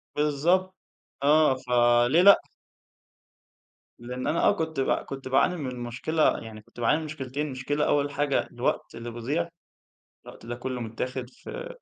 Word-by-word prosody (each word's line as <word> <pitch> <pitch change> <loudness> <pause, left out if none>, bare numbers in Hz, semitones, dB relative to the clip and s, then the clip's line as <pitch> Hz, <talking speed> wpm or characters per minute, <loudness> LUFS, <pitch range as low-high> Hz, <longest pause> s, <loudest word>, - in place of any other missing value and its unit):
بالضبط. 170 +6 +1 0.5
آه، 150 -1 +5
فليه 120 +3 +3
لأ؟ 200 +1 +8 1.6
لأن 125 +2 -5
أنا 170 - +1
آه - - +6
كنت 160 -3 -3
ب 135 - +1
كنت 135 -1 -3
باعاني 135 +7 +3
من 130 -5 -5
مشكلة، 125 +7 0
يعني 110 -1 -10
كنت 105 - -17
باعاني 120 +6 +3
من 160 - -6
مشكِلتين. 145 -1 -4
مشكلة 145 +3 -1
أوَّل 145 0 +1
حاجة 145 0 0
الوقت - - -2
اللي 115 +1 -6
بيضيع، 140 +9 -2 0.8
الوقت - - -12
ده 120 - -4
كله 125 0 -5
متاخد 125 +2 -4
في - - -8
135 Hz, 145 wpm, -26 LUFS, 120-150 Hz, 1.6 s, لأ